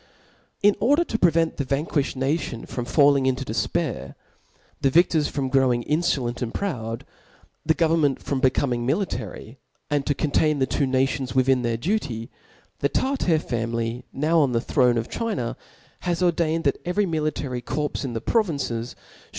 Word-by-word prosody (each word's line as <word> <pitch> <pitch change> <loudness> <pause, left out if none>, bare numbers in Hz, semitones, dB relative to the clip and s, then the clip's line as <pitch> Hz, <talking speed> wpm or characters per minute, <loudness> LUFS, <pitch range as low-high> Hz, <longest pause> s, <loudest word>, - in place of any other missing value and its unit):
In 205 0 +5
order 290 +9 +4
to 225 -9 -3
prevent 165 -2 +2
the 140 - 0
vanquiihed 140 +1 -1
nation 135 -3 -2
from 120 - -4
falling 140 +1 +4
into 130 -1 0
defpair, - - -2 0.7
the 135 - +3
vidocf 160 0 +3
from 140 -2 -2
growing 130 -2 +2
in* 150 +6 +1
ibVent 125 -8 -1
and 120 -2 -2
proudt 115 - -3 0.6
the 160 +1 +2
government 160 -5 +2
from 140 - -2
becoming 130 -2 +1
military, 125 - -3 0.3
a(i|d 145 -1 +2
to 145 - 0
contain 150 +1 +1
the 135 - +2
two 140 +1 0
nations 130 0 0
wichia 130 -1 +3
their 115 -1 -1
duty 120 - -2
•, - - -36 0.5
the 140 - +1
Tartar 260 - +1
family 115 -3 -2
ppw' 155 +4 -1
Op 130 -3 0
the 115 - +2
throne 125 -2 +2
of 115 - -2
China, 175 - -2 0.4
has 175 0 -1
ordained 165 -2 +1
that 140 - 0
every 180 +4 +1
military 155 -6 -2
corps 150 +4 -3
in 130 -3 -3
the 115 - -3
provinces 140 - -1
Ihould. - - -24
140 Hz, 165 wpm, -24 LUFS, 125-165 Hz, 0.7 s, In